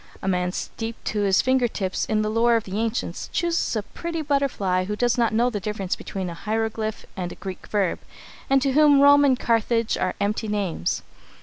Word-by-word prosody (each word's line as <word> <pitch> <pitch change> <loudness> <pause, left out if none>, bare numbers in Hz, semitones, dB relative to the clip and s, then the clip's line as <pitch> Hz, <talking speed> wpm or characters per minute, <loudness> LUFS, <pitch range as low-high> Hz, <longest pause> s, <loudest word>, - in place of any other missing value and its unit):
A - - -6
man 180 -1 +1
steeped 225 +4 -6
to 210 - -1
his 200 -2 +3
finger 255 -1 +3
tips 190 -4 -2
in 215 -1 0
the 215 - -1
lore 230 +1 +3
of 225 - +1
the 195 +2 -4
ancients 225 -6 -2
chooses 340 -5 0
a 215 - -1
pretty 330 +7 -5
butterfly 255 -11 0
who 210 +2 -3
does 240 +2 +1
not 235 -2 +2
know 235 +3 +2
the 210 - -2
difference 200 -2 -3
between 190 -2 -5
a 170 - -5
hieroglyph 220 +3 -3
and 180 -2 -4
a - - -8
Greek 190 -2 -8
verb, 200 -4 0 0.5
and 270 0 +4
to 275 - +2
whom 290 0 +5
Rome 285 +1 +7
and 265 -3 +3
Carthage 230 0 +1
are 185 - -1
empty 210 +2 -1
names. 195 - -1
220 Hz, 205 wpm, -24 LUFS, 195-250 Hz, 0.5 s, Rome